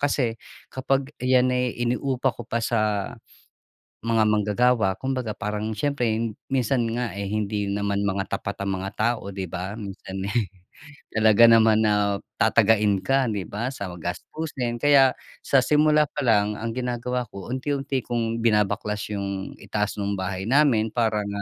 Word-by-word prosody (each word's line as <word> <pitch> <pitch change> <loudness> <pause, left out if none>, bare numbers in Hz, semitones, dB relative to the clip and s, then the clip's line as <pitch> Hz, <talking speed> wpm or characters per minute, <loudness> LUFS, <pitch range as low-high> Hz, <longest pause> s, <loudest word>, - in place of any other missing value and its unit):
kasi 135 -5 +1 0.4
kapag 135 +2 -1
ayan 125 0 +3
ay 125 -1 -1
ini-upa 125 +1 0
ko 120 0 -10
pa 115 - -2
sa 105 -4 0 0.9
mga 115 -1 +3
manggagawa, 105 -1 +2
kumbaga 130 -2 -3
parang 105 0 -3
siyempre 140 +2 -1 0.4
minsan 125 -2 +1
nga, 120 -3 -2
eh, 100 - -3
hindi 105 0 -2
naman 100 0 -1
mga 95 0 -2
tapat 100 0 -5
ang 95 -1 -1
mga 95 +1 -4
tao 115 +2 0
di 95 -3 -5
ba? 95 +3 -4
Minsan, 95 -2 -7
eh, 120 - +1 0.7
talaga 110 +1 +6
naman 110 -1 +5
na 105 -2 +2 0.2
tatagain 105 -3 +3
ka 135 -1 +2
di 100 -2 -2
ba, 120 +6 -3
sa 100 -6 -5
gastusin 120 - -4
kaya 140 -1 +5 0.3
sa 135 - +3
simula 150 0 +4
pa - - -6
lang 105 -3 +3
ang 115 +2 -4
ginagawa 125 0 -2
ko 100 +3 -8
unti-unti 135 0 -2
kung 115 -1 -1
binabaklas 105 -2 0
yung 100 -2 -4
itaas 105 -1 -2
ng 100 0 -1
bahay 95 0 -3
namin 120 -5 +3
parang, 110 -3 +1
110 Hz, 150 wpm, -24 LUFS, 100-125 Hz, 0.9 s, talaga